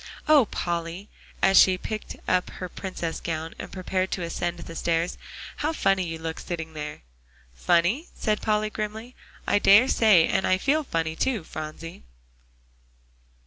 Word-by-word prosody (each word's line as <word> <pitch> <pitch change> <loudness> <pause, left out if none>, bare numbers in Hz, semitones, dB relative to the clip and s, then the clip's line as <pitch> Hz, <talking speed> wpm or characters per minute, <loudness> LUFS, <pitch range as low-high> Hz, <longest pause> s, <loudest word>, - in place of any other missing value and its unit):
Oh, 295 -5 +6
Polly!" 170 +1 -4 0.3
as 195 0 +7
she 185 -1 +6
picked 215 +3 -6
up 185 0 +1
her 185 - -6
Princess 175 -2 -5
gown 160 -1 -4
and - - -7
prepared 185 0 -2
to 180 - -3
ascend 175 +1 -3
the 165 -1 -9
stairs, 170 +1 0 0.4
"how 305 +2 -1
funny 195 -9 +2
you 165 0 -4
look 160 0 -5
sitting 160 -2 -5
there!" 150 -1 -6 0.5
"Funny?" 175 - +1
said 215 -2 -1
Polly 215 0 0
grimly. 220 +3 -5 0.3
"I - - +3
dare 205 +6 +7
say, 210 -10 +5
and 190 - 0
I 185 - +3
feel 290 +9 +1
funny 165 - -2
too, 235 -1 -1
Phronsie." 155 +2 -8
185 Hz, 150 wpm, -25 LUFS, 165-215 Hz, 0.5 s, as